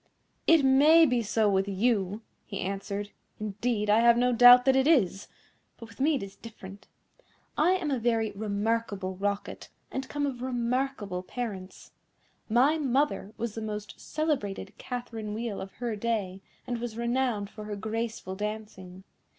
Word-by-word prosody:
"It 325 -3 +6
may 300 +5 +7
be 250 -4 +1
so 220 0 +1
with 195 -1 +2
you," 205 0 0 0.2
he 200 - -5
answered; 200 +2 -4 0.3
"indeed, 215 +1 -2
I 210 +2 +5
have 235 0 +5
no 250 +1 +3
doubt 245 +1 +8
that 265 -1 +4
it 265 +1 +3
is, 205 - +2 0.5
but 230 - -11
with 225 - -17
me 300 +3 +3
it 265 - -3
is 195 0 -9
different. 200 -3 -12 0.7
I 345 +4 +3
am 350 -6 -1
a 265 - 0
very 225 -2 +1
remarkable 205 -2 -2
Rocket, 200 +1 -3 0.2
and 265 0 -4
come 290 0 -1
of 255 -4 -4
remarkable 245 -5 -2
parents. 195 -2 -7 0.6
My 265 +8 +3
mother 270 -6 0
was 235 -2 -3
the 225 - -5
most 210 -1 -6
celebrated 295 -11 -2
Catherine 230 -4 -5
Wheel 225 -2 -4
of 195 - -8
her 240 -3 -3
day, 205 -4 -2 0.2
and 240 -1 -3
was 235 -2 -5
renowned 235 -4 -1
for 215 -1 -9
her 210 -1 -4
graceful 220 -2 -4
dancing. 205 -3 -6
225 Hz, 160 wpm, -28 LUFS, 205-250 Hz, 0.7 s, doubt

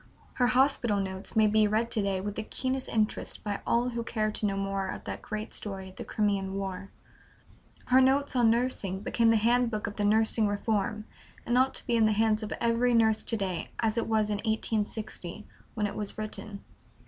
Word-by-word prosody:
Her 245 - +2
"Hospital 250 -4 +2
Notes" 190 0 -4
may 220 -1 +5
be 215 0 +4
read 225 +3 0
to 215 - +1
day 195 -1 0
with 205 +1 -4
the 220 - -4
keenest 260 +4 -3
interest 215 -1 -1
by 205 -1 -2
all 240 +1 +2
who 235 -1 -3
care 215 -2 -1
to 215 - -1
know 195 -1 -2
more 195 -1 -2
of - - -6
that - - -6
great 215 +1 -5
story 195 -2 -5
of 185 - -16
the - - -5
Crimean 200 -3 -1
War; 195 0 -4 1.0
her 255 +1 +5
"Notes 270 +1 +2
on 240 -2 +5
Nursing" 225 -5 0
became 230 +2 +2
the 225 - +5
handbook 230 0 +2
of 205 - -6
the 210 - 0
Nursing 220 +1 +3
Reform, 210 +1 -1 0.4
and 240 - +1
ought 260 +1 +3
to - - -5
be 240 - +1
in 225 -1 +4
the 215 - +2
hands 220 0 +2
of 215 - -5
every 235 +1 +2
nurse 220 -1 +4
to 225 - +1
day 190 -4 -3
as 220 -1 0
it 230 - -1
was 215 -1 +1
in 205 - 0
1860, 215 -3 -3 0.3
when 210 -2 0
it 205 - -3
was 210 -1 -4
written. 215 -1 -6
215 Hz, 205 wpm, -29 LUFS, 205-230 Hz, 1.0 s, may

